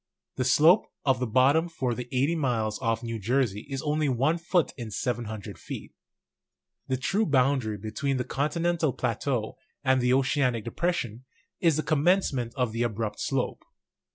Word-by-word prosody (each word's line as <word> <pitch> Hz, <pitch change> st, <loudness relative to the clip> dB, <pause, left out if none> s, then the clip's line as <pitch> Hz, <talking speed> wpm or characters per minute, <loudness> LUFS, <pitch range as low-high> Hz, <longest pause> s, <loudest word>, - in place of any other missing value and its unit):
The 130 Hz, -, -1 dB
slope 155 Hz, -, +5 dB, 0.2 s
of 135 Hz, -3 st, +3 dB
the 125 Hz, -, -1 dB
bottom 140 Hz, +8 st, +3 dB
for 130 Hz, -7 st, -2 dB
the 125 Hz, +1 st, -5 dB
80 135 Hz, +5 st, +2 dB
miles 115 Hz, -8 st, -1 dB
off 115 Hz, -1 st, -1 dB
New 115 Hz, -1 st, -4 dB
Jersey 115 Hz, 0 st, 0 dB
is 135 Hz, -1 st, -4 dB
only 150 Hz, -1 st, +1 dB
1 140 Hz, +7 st, +1 dB
foot 170 Hz, -2 st, +1 dB
in 115 Hz, -2 st, -6 dB
700 110 Hz, -2 st, -4 dB
feet. -, -, -8 dB, 0.9 s
The 130 Hz, -, 0 dB
true 195 Hz, -, +1 dB
boundary 130 Hz, -5 st, +2 dB
between 110 Hz, +7 st, -2 dB
the 125 Hz, -, -1 dB
continental 165 Hz, +2 st, 0 dB
plateau 120 Hz, -1 st, -2 dB, 0.3 s
and 130 Hz, -1 st, +3 dB
the 125 Hz, 0 st, +2 dB
oceanic 130 Hz, -4 st, +1 dB
depression 125 Hz, -4 st, -2 dB, 0.3 s
is 165 Hz, -4 st, +3 dB
the 155 Hz, -, 0 dB
commencement 150 Hz, -6 st, +1 dB
of 125 Hz, -4 st, 0 dB
the 115 Hz, +2 st, -3 dB
abrupt 110 Hz, -2 st, -2 dB
slope. 135 Hz, -2 st, -2 dB
130 Hz, 155 wpm, -27 LUFS, 115-150 Hz, 0.9 s, slope